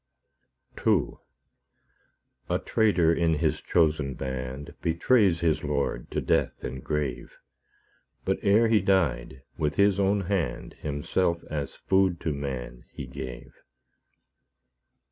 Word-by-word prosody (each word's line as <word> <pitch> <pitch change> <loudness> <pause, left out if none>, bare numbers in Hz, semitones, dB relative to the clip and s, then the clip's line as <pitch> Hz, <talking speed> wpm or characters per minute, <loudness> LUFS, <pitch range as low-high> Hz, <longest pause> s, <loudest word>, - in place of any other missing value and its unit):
II - - +3 1.4
A - - +2
traitor 95 -7 +2
in 85 -1 +2
His 75 - 0
chosen 75 -5 +1
band 65 +1 -5
Betrays 85 +1 +3
his 80 -2 +1
Lord 70 -5 -2
to - - -1
death - - 0
and 65 0 -5
grave; 75 -5 -3 0.9
But 95 - 0
ere 105 +3 +4
He 110 -3 +4
died, 75 -9 0 0.2
with 75 -1 0
His 100 -1 +3
own 100 +1 +2
hand 85 -11 -2
Himself 85 +4 -1
as 75 -3 -3
food 95 -2 +2
to 80 - -1
man 65 -4 -5
He - - -7
gave. 65 -2 -8
80 Hz, 115 wpm, -27 LUFS, 65-95 Hz, 1.4 s, ere